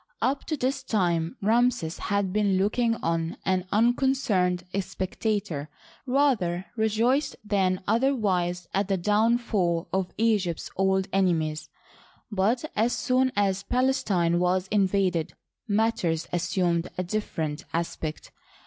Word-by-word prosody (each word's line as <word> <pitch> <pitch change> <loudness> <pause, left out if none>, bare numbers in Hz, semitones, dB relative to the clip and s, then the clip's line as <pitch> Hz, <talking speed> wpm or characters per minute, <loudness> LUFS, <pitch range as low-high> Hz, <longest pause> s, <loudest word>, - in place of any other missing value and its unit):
Up 270 +2 0
to 310 - -2
this 260 +1 -1
time 175 -9 0
Ramses 225 -6 +2
had 200 -2 -1
been 205 -2 +2
looking 230 +4 +1
on, 165 0 -1
an 185 -1 0
unconcerned 220 -6 +2 0.2
spectator, 190 -5 -3 0.4
rather 240 -10 +1
re 220 -1 +2
joiced 245 +7 +1
than 190 -3 +1
otherwise 200 -8 +1
at 195 0 +1
the 195 -1 +1
downfall 205 -3 +1
of 190 -1 0
Egypt's 210 -7 0
old 190 0 +1
ene 185 -3 +3
mies; 155 -1 -4 0.6
but 215 +8 +1
as 225 +3 +2
soon 260 0 +1
as 195 -1 +1
Palestine 200 -8 +1
was 180 +1 +1
invaded, 190 -5 +1 0.3
matters 200 -7 +1
as 175 - 0
sumed 175 -3 +1
a 185 - 0
different 165 -6 -3
aspect. 165 -2 -4
195 Hz, 120 wpm, -26 LUFS, 175-225 Hz, 0.6 s, ene